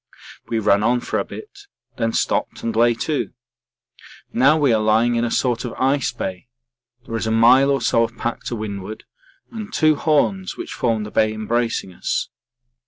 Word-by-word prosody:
We 115 Hz, -, -1 dB
ran 105 Hz, -2 st, +3 dB
on 120 Hz, +3 st, +2 dB
for -, -, -2 dB
a -, -, 0 dB
bit, 410 Hz, -1 st, -11 dB, 0.3 s
then 115 Hz, -1 st, 0 dB
stopped -, -, -1 dB
and 115 Hz, -, -2 dB
lay 120 Hz, +1 st, +4 dB
to. 155 Hz, -3 st, -2 dB, 1.0 s
Now 135 Hz, +6 st, +4 dB
we 140 Hz, -6 st, +3 dB
are 110 Hz, -, +2 dB
lying 110 Hz, +3 st, +3 dB
in 120 Hz, 0 st, +1 dB
a 120 Hz, -, 0 dB
sort 120 Hz, -1 st, 0 dB
of 120 Hz, -, -5 dB
ice 135 Hz, 0 st, +1 dB
bay 95 Hz, +3 st, -6 dB, 0.6 s
there 115 Hz, -, -5 dB
is 110 Hz, -, -2 dB
a -, -, 0 dB
mile 125 Hz, +5 st, +5 dB
or 135 Hz, -2 st, +1 dB
so 115 Hz, 0 st, +2 dB
of 115 Hz, +1 st, -4 dB
pack 120 Hz, -, -3 dB
to 120 Hz, -, -3 dB
windward, 105 Hz, -1 st, -6 dB, 0.5 s
and 220 Hz, -3 st, -7 dB
two 155 Hz, -1 st, +3 dB
horns 165 Hz, +6 st, 0 dB
which 350 Hz, -1 st, -6 dB
form 115 Hz, -3 st, 0 dB
the 105 Hz, -, -7 dB
bay 110 Hz, 0 st, +2 dB
embracing 110 Hz, -2 st, -2 dB
us. -, -, -2 dB
120 Hz, 185 wpm, -21 LUFS, 110-140 Hz, 1.0 s, mile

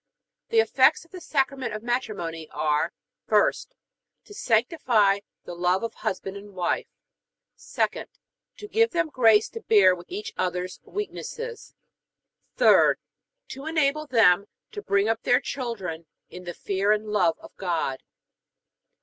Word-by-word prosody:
The 455 Hz, -1 st, +5 dB
effects 445 Hz, -, +3 dB
of 335 Hz, -, -26 dB
the 365 Hz, -2 st, -9 dB
Sacrament 270 Hz, -6 st, -1 dB
of 215 Hz, -, -7 dB
Matrimony 210 Hz, -, -3 dB
are: 150 Hz, -1 st, 0 dB, 0.4 s
1st, -, -, +2 dB, 0.6 s
To -, -, -13 dB
sanctify 225 Hz, -, +2 dB, 0.2 s
the -, -, -8 dB
love 180 Hz, +3 st, 0 dB
of 230 Hz, -, -3 dB
husband 190 Hz, 0 st, -4 dB
and 200 Hz, -1 st, -12 dB
wife; 180 Hz, -1 st, -1 dB, 0.7 s
2d, -, -, -2 dB, 0.5 s
To 420 Hz, -, -9 dB
give 455 Hz, +2 st, +3 dB
them 340 Hz, -4 st, -1 dB
grace 225 Hz, -6 st, +4 dB
to 455 Hz, -, -8 dB
bear 200 Hz, -, +5 dB
with 175 Hz, -1 st, -9 dB
each 420 Hz, +4 st, -6 dB
other's 180 Hz, 0 st, -3 dB
weaknesses; 460 Hz, +3 st, -6 dB, 0.8 s
3d, -, -, +6 dB, 0.5 s
To 270 Hz, +2 st, -8 dB
enable 305 Hz, -1 st, +1 dB
them 200 Hz, -6 st, +4 dB, 0.2 s
to 420 Hz, -1 st, -6 dB
bring 200 Hz, -, +1 dB
up 225 Hz, 0 st, 0 dB
their 245 Hz, -, +3 dB
children 190 Hz, -, -5 dB, 0.2 s
in 180 Hz, 0 st, -10 dB
the 175 Hz, -1 st, -6 dB
fear 200 Hz, +1 st, 0 dB
and 215 Hz, 0 st, +1 dB
love 210 Hz, -6 st, +1 dB
of -, -, -15 dB
God. 165 Hz, -8 st, -2 dB
220 Hz, 140 wpm, -25 LUFS, 185-305 Hz, 0.8 s, 3d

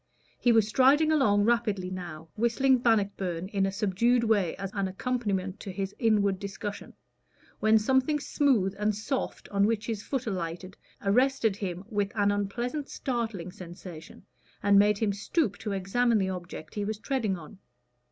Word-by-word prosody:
He 245 Hz, -, +4 dB
was 225 Hz, -2 st, +4 dB
striding 275 Hz, +7 st, +4 dB
along 210 Hz, -10 st, +3 dB
rapidly 210 Hz, -5 st, +1 dB
now, 170 Hz, -4 st, -7 dB
whistling 245 Hz, +4 st, +3 dB
"Bannockburn" 195 Hz, -6 st, 0 dB
in 195 Hz, -2 st, +1 dB
a -, -, -2 dB
subdued 215 Hz, +5 st, +2 dB
way 205 Hz, -7 st, +2 dB
as 195 Hz, 0 st, -5 dB
an 200 Hz, -2 st, -1 dB
accompaniment 195 Hz, -2 st, -2 dB
to 195 Hz, -, -6 dB
his 195 Hz, +1 st, -4 dB
inward 205 Hz, -5 st, +2 dB
discussion, 200 Hz, +1 st, -6 dB, 0.6 s
when 220 Hz, +1 st, +5 dB
something 265 Hz, +6 st, +2 dB
smooth 255 Hz, -11 st, +1 dB
and 210 Hz, 0 st, +1 dB
soft 255 Hz, +6 st, -3 dB
on 200 Hz, 0 st, +2 dB
which 220 Hz, -1 st, -1 dB
his 220 Hz, -3 st, -3 dB
foot 260 Hz, +2 st, -3 dB
alighted 185 Hz, -2 st, -4 dB, 0.3 s
arrested 235 Hz, +1 st, +2 dB
him 185 Hz, -3 st, -4 dB
with 205 Hz, -3 st, -1 dB
an 205 Hz, -1 st, +3 dB
unpleasant 240 Hz, +8 st, -2 dB
startling 225 Hz, -, -3 dB
sensation, 175 Hz, -2 st, -11 dB, 0.4 s
and 200 Hz, 0 st, +6 dB
made 205 Hz, 0 st, +4 dB
him 205 Hz, -2 st, 0 dB
stoop 205 Hz, -, 0 dB
to 210 Hz, -, -4 dB
examine 220 Hz, +5 st, +1 dB
the 190 Hz, -2 st, 0 dB
object 175 Hz, -3 st, -7 dB
he 205 Hz, -, -2 dB
was 215 Hz, +1 st, -3 dB
treading 220 Hz, -5 st, -1 dB
on. 170 Hz, +4 st, -12 dB
205 Hz, 160 wpm, -28 LUFS, 190-235 Hz, 0.6 s, and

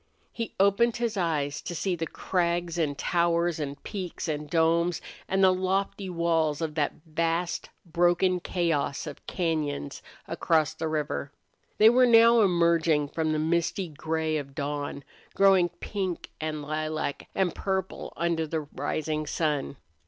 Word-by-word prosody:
He 230 Hz, -1 st, -5 dB
opened 200 Hz, +4 st, +3 dB
his 235 Hz, -2 st, -1 dB
eyes 150 Hz, -6 st, -1 dB
to 175 Hz, -, -5 dB
see 185 Hz, +2 st, -1 dB
the 165 Hz, -1 st, -3 dB
crags 175 Hz, 0 st, -1 dB
and 145 Hz, -4 st, 0 dB
towers 170 Hz, -1 st, +1 dB
and 145 Hz, -1 st, -5 dB
peaks 185 Hz, -4 st, -5 dB
and 150 Hz, -1 st, -3 dB
domes, 165 Hz, +1 st, +2 dB, 0.3 s
and 190 Hz, 0 st, +2 dB
the 185 Hz, -1 st, +6 dB
lofty 190 Hz, +1 st, -1 dB
walls 165 Hz, -3 st, +1 dB
of 160 Hz, -2 st, -2 dB
that 150 Hz, -2 st, 0 dB
vast, 165 Hz, +2 st, -1 dB, 0.2 s
broken 175 Hz, +2 st, +2 dB
chaos 165 Hz, -6 st, -1 dB
of 150 Hz, -3 st, -8 dB
cañons 155 Hz, -, -2 dB, 0.3 s
across 160 Hz, -2 st, +1 dB
the 160 Hz, 0 st, -3 dB
river. 150 Hz, -2 st, -2 dB, 0.5 s
They 220 Hz, +1 st, +7 dB
were 250 Hz, +1 st, +5 dB
now 230 Hz, 0 st, +7 dB
emerging 170 Hz, -5 st, +3 dB
from 160 Hz, +1 st, -1 dB
the 155 Hz, -, +1 dB
misty 170 Hz, +3 st, 0 dB
gray 160 Hz, +1 st, -1 dB
of 140 Hz, -2 st, -7 dB
dawn, 145 Hz, 0 st, -3 dB, 0.3 s
growing 190 Hz, -3 st, +5 dB
pink 190 Hz, -3 st, -4 dB
and 155 Hz, -1 st, -3 dB
lilac 155 Hz, -1 st, -3 dB
and 185 Hz, -3 st, +1 dB
purple 190 Hz, -1 st, -3 dB
under 165 Hz, -1 st, 0 dB
the 160 Hz, +1 st, -2 dB
rising 155 Hz, +1 st, -3 dB
sun. 150 Hz, -3 st, -1 dB
165 Hz, 145 wpm, -27 LUFS, 155-180 Hz, 0.5 s, They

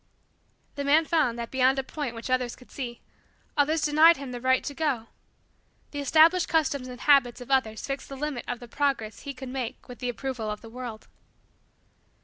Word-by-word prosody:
The 285 Hz, -, -1 dB
man 300 Hz, +3 st, +4 dB
found, 305 Hz, -8 st, +1 dB
that, 235 Hz, -1 st, -5 dB
beyond 265 Hz, +1 st, +3 dB
a 270 Hz, -, 0 dB
point 265 Hz, -3 st, -5 dB
which 230 Hz, +3 st, -6 dB
others 250 Hz, -2 st, +1 dB
could 250 Hz, -, -18 dB
see, 240 Hz, -3 st, -6 dB, 0.5 s
others 305 Hz, +1 st, +2 dB
denied 315 Hz, +3 st, +6 dB
him 270 Hz, -2 st, -7 dB
the 245 Hz, -1 st, -6 dB
right 260 Hz, +1 st, +3 dB
to 285 Hz, -, -4 dB
go. 280 Hz, -7 st, -1 dB, 0.9 s
The 290 Hz, -, -5 dB
established 325 Hz, +5 st, +5 dB
customs 285 Hz, -5 st, +1 dB
and 250 Hz, -1 st, -9 dB
habits 275 Hz, -5 st, +4 dB
of 245 Hz, +2 st, -9 dB
others 225 Hz, -5 st, +1 dB
fixed 275 Hz, -1 st, -5 dB
the 275 Hz, -, -7 dB
limit 290 Hz, -3 st, -3 dB
of 245 Hz, -, -3 dB
the 240 Hz, -, -10 dB
progress 250 Hz, -4 st, -1 dB
he 280 Hz, -1 st, -7 dB
could 260 Hz, 0 st, -7 dB
make 255 Hz, -3 st, -5 dB
with 250 Hz, -, -10 dB
the 250 Hz, -, -2 dB
approval 245 Hz, -2 st, -4 dB
of 210 Hz, 0 st, -4 dB
the 225 Hz, -, -12 dB
world. 240 Hz, -3 st, -7 dB
265 Hz, 195 wpm, -27 LUFS, 245-290 Hz, 0.9 s, denied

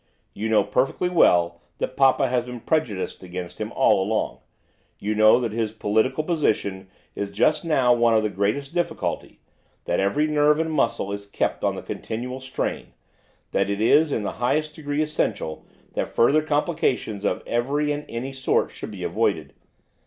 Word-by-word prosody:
You 110 Hz, +2 st, -3 dB
know 110 Hz, -, +4 dB
perfectly 135 Hz, +7 st, 0 dB
well 85 Hz, -, +3 dB, 0.2 s
that -, -, -3 dB
papa 135 Hz, 0 st, +4 dB
has 125 Hz, -1 st, 0 dB
been 125 Hz, -1 st, -8 dB
prejudiced 120 Hz, -, -1 dB
against 90 Hz, -1 st, -7 dB
him -, -, -3 dB
all 95 Hz, -, +3 dB
along, 110 Hz, +3 st, -1 dB, 0.6 s
you 105 Hz, +1 st, -2 dB
know 110 Hz, +2 st, +6 dB
that 120 Hz, -3 st, -2 dB
his 110 Hz, -1 st, -2 dB
political 110 Hz, +7 st, +1 dB
position 105 Hz, -, -1 dB, 0.3 s
is 100 Hz, -, -3 dB
just 100 Hz, +9 st, +2 dB
now 135 Hz, -7 st, +3 dB
one 120 Hz, -1 st, +3 dB
of 110 Hz, -, +3 dB
the 105 Hz, -, 0 dB
greatest 105 Hz, -, -1 dB
difficulty, 175 Hz, -1 st, -3 dB, 0.4 s
that 85 Hz, -, 0 dB
every 100 Hz, +11 st, +2 dB
nerve 150 Hz, 0 st, +3 dB
and 160 Hz, 0 st, -1 dB
muscle 135 Hz, -9 st, 0 dB
is 100 Hz, 0 st, -5 dB
kept 100 Hz, -, -2 dB
on -, -, +1 dB
the -, -, -7 dB
continual 125 Hz, +3 st, -5 dB
strain, 130 Hz, 0 st, -4 dB, 0.6 s
that -, -, +1 dB
it 100 Hz, 0 st, -1 dB
is 145 Hz, +8 st, +4 dB
in 110 Hz, -, -1 dB
the -, -, -4 dB
highest 150 Hz, +5 st, +1 dB
degree 145 Hz, -1 st, -2 dB
essential 150 Hz, -, -2 dB, 0.3 s
that -, -, -2 dB
further 140 Hz, +6 st, +3 dB
complications 150 Hz, -, -1 dB
of -, -, -1 dB
every 140 Hz, +5 st, 0 dB
and 145 Hz, 0 st, -3 dB
any 125 Hz, +4 st, -5 dB
sort 130 Hz, 0 st, 0 dB
should -, -, -7 dB
be -, -, -7 dB
avoided. -, -, -1 dB
125 Hz, 170 wpm, -24 LUFS, 105-150 Hz, 0.6 s, know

